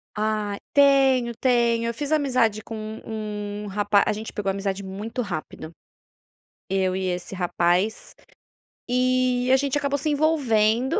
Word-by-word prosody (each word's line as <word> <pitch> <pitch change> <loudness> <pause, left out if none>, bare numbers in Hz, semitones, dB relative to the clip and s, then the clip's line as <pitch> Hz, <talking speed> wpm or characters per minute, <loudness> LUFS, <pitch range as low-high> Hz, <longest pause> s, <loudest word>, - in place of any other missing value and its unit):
Ah, 210 -1 -1 0.2
tenho, 270 -4 +4
tenho. 235 -2 +2
Eu 235 - -3
fiz 290 +4 -5
amizade 255 -8 +2
com 225 - -7
um 215 -1 -6
um - - -6
rapaz 205 0 +2
a - - +2
gente 215 +1 -6
pegou 200 -2 -3
amizade 195 0 -3
muito 205 +6 -5
rápido, 160 -4 -6 1.0
eu 190 -1 +1
e 190 -1 -2
esse 180 +2 -5
rapaz, 180 +3 0 0.8
e 250 0 +1
a 265 - +6
gente 280 +1 0
acabou 285 -1 0
se 305 +3 -1
envolvendo 260 -6 +2
220 Hz, 140 wpm, -24 LUFS, 200-255 Hz, 1.0 s, a